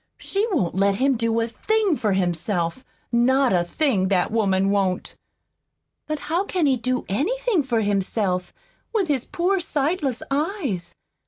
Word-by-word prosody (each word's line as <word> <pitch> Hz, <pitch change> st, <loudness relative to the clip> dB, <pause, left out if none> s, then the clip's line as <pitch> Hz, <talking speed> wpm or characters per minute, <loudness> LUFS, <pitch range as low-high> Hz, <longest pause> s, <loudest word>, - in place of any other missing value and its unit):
She 405 Hz, +3 st, -1 dB
won't 255 Hz, -, 0 dB
let 195 Hz, +2 st, +2 dB
him 270 Hz, +5 st, +2 dB
do 230 Hz, 0 st, 0 dB
a 225 Hz, -, 0 dB
thing 415 Hz, -, +1 dB
for 210 Hz, -7 st, 0 dB
himself 175 Hz, +3 st, -1 dB, 0.3 s
not 250 Hz, +1 st, +3 dB
a 175 Hz, -1 st, +3 dB
thing, 200 Hz, -, +1 dB
that 185 Hz, 0 st, +1 dB
woman 195 Hz, -3 st, +2 dB
won't!" 195 Hz, -2 st, 0 dB, 0.9 s
"But 305 Hz, -1 st, -3 dB
how 340 Hz, +5 st, 0 dB
can 365 Hz, -5 st, 0 dB
he 270 Hz, -2 st, +4 dB
do 255 Hz, +1 st, -2 dB
anything 405 Hz, -, +1 dB
for 240 Hz, -5 st, 0 dB
himself, 195 Hz, -2 st, 0 dB, 0.4 s
with 390 Hz, -7 st, +1 dB
his 270 Hz, -5 st, 0 dB
poor 370 Hz, +3 st, 0 dB
sightless 295 Hz, -4 st, -1 dB
eyes?" 290 Hz, -, -2 dB
240 Hz, 150 wpm, -23 LUFS, 195-310 Hz, 0.9 s, he